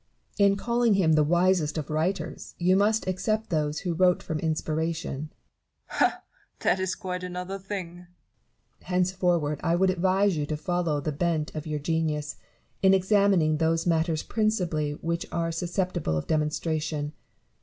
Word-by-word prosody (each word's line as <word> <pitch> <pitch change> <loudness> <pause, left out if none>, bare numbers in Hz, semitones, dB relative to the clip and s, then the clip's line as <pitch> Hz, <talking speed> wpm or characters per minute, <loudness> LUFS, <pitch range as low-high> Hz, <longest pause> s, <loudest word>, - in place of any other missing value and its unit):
Barrow. 200 -1 +5
In 200 - +2
calling 235 +2 +2
him 170 -5 +3
the 155 -1 +4
wisest 175 -1 +2
of 155 -1 -4
writers, 165 +6 -2
you 180 +2 +3
must 210 +2 +2
except 215 +4 -1
those 150 -2 0
who 180 -3 -1
wrote 180 +1 +3
from 160 -2 -3
inspiration. 160 -2 -2
Newton. - - -34 0.6
Ha! - - +1 0.4
that 190 - +2
is 185 -1 -1
quite 180 -1 -5
another 180 +2 -5
thing. 190 -3 -5
Barrow. 175 0 -14 0.8
Henceforward 180 -5 +1
I 165 - +2
would 185 +1 +3
advise 190 +1 +2
you 150 -1 -2
to 155 - -2
follow 165 -2 -1
the 155 - -2
bent 155 0 -1
of 155 0 -5
your 155 -1 -2
genius, 150 -1 -1 0.4
in 195 0 +6
examining 190 -5 +3
those 165 +1 +1
matters 165 -2 +1
principally 180 -9 0
which 170 +3 -3
are 165 0 -1
susceptible 175 - -1
of 75 - -3
demonstration. 155 -1 -1
170 Hz, 155 wpm, -27 LUFS, 155-185 Hz, 0.8 s, in